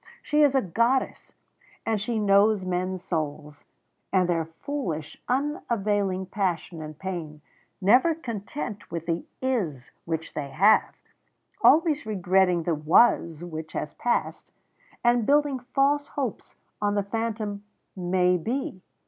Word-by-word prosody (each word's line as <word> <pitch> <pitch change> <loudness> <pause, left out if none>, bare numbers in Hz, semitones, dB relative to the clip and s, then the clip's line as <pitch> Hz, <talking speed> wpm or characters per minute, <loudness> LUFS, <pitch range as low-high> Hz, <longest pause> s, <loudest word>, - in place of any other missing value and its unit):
She 300 +1 +2
is 285 -2 +5
a 265 - +3
goddess, 235 +8 0 0.5
and 220 -3 0
she 225 +2 -2
knows 200 -1 +4
men's 185 0 -2
souls, 150 -4 -4 0.5
and 185 -2 +3
their 165 -2 0
foolish 165 - -5
unavailing 210 -8 0
passion 180 -4 -2
and 155 -1 -8
pain 165 -5 -6 0.4
never 250 - +4
content 230 -4 -6
with 165 -1 -5
the 170 0 -2 0.2
Is 185 - -2
which 165 -1 -4
they 140 -2 -4
have, 205 +9 +4 0.7
always 305 -5 +4
regretting 185 -3 +2
the 170 - 0
Was 160 +1 +3
which 160 -2 -7
has 150 - -4
passed, 240 - -2 0.5
and 240 -2 +3
building 290 -2 +3
false 275 +3 +1
hopes 265 -7 -5 0.3
on 205 0 +1
the 205 - +1
phantom 215 -1 -3 0.3
_May 180 -1 +1
be. 235 -5 -3
200 Hz, 125 wpm, -26 LUFS, 170-240 Hz, 0.7 s, is